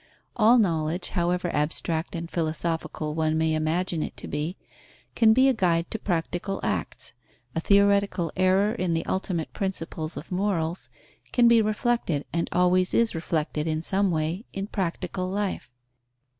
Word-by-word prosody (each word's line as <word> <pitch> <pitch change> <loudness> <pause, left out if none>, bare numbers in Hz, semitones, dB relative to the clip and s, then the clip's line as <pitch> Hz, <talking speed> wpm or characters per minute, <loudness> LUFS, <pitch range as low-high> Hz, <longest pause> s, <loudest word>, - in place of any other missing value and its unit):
All 230 +1 +6
knowledge, 170 -4 +1
however 175 -1 0
abstract 160 +4 0
and 170 0 -4
philosophical 160 -2 -2
one 155 0 0
may 160 0 +1
imagine 160 +2 0
it - - -5
to - - -8
be, 150 +5 -3 0.6
can 225 -2 +5
be 260 +4 +5
a 265 - +4
guide 170 -6 +1
to 220 - -3
practical 175 +1 -2
acts; - - -2 0.4
a - - -1
theoretical 200 -2 +3
error 190 +3 +3
in 185 -7 -1
the 165 - -2
ultimate 180 -4 -2
principles 165 -4 -3
of 165 - -8
morals 180 -3 -1 0.4
can 240 -1 +5
be 235 -1 +6
reflected 215 - 0
and 170 0 -1
always 180 +1 +2
is 230 -1 +3
reflected 155 -1 -2
in 155 0 -1
some 195 +2 +2
way, 165 +6 -2
in 195 0 -3
practical 185 -2 -3
life. 200 -5 -3
175 Hz, 150 wpm, -26 LUFS, 160-200 Hz, 0.6 s, All